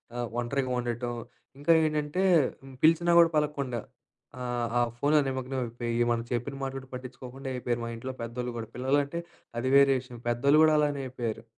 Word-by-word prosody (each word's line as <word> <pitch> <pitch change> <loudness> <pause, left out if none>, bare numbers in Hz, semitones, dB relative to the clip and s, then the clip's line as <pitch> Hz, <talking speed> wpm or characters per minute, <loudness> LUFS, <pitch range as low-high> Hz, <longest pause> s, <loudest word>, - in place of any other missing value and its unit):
ఆహ్, 120 -1 -2
ఒంటరిగా 130 +1 -1
ఉండటం. 120 0 -3 0.4
ఇంకా 145 +4 +2
ఏంటంటే 150 +3 -1 0.6
పిలిచినా 165 +2 +5
కూడా 165 -1 +7
పలకకుండా, 140 -5 -1 0.6
ఆహ్, 120 -1 -1
ఆ - - +4 0.2
ఫోన్‌లో 150 +3 +3
నిమగ్నం 130 0 -3
అయిపోయి, 120 0 -2
మనం 115 0 0
చెప్పిన 120 +3 -2
మాటలు 135 0 -3
కూడా 130 - -17
పట్టించుకోకుండా 130 +1 -8
అయిపోయారు, 120 -1 -2
మా - - -4
ఇంట్లో 130 +3 -5
పెద్దోళ్ళు 120 +1 -4
కూడా. 110 -1 -6
పిల్లలంటే 140 +5 0 0.4
అది 130 +2 -1
వేరే 140 0 +6
విషయం, 125 -2 -11
పెద్దోళ్ళు 140 +6 +4
కూడా 155 -1 +5
అలానే 145 -2 +1
అయిపోయారు. 115 -3 -4
130 Hz, 160 wpm, -28 LUFS, 120-140 Hz, 0.6 s, కూడా